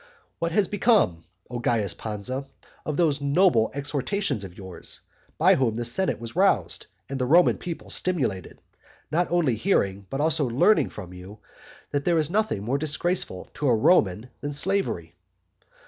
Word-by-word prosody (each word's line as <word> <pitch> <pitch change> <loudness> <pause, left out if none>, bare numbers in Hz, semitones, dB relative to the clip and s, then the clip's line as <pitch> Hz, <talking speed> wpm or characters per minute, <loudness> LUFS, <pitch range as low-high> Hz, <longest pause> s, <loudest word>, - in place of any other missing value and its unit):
What 170 0 -1
has 195 +2 +2
become, 205 - +2 0.3
O 120 - -3
Carus 110 -6 +1
Pansa, 115 +8 -5 0.4
of 150 - -2
those 150 -5 +2
noble 140 -5 +3
exhortations 140 - -2
of 90 -2 -10
yours, 95 -2 -8 0.4
by - - +5
which 120 -4 +1
the 120 +1 -3
senate 155 +9 +1
was 115 +2 -8
roused, 135 - +1 0.2
and 135 0 -4
the 125 - 0
Roman 175 +6 +5
people 170 -2 -7
stimulated, 130 - -2 0.5
not 170 +3 0
only 170 -8 +2
hearing 100 - 0
but 135 - -4
also 155 -2 +2
learning 140 - +3
from 90 -3 -9
you 90 +3 -11 0.5
that 140 0 -1
there 170 +1 +2
is 155 0 0
nothing 210 - 0
more 130 +6 -1
disgraceful 155 - -2
to 150 - -2
a 120 - +4
Roman 110 - +2
than 145 0 -4
slavery? 150 - -1
140 Hz, 160 wpm, -25 LUFS, 105-175 Hz, 0.5 s, by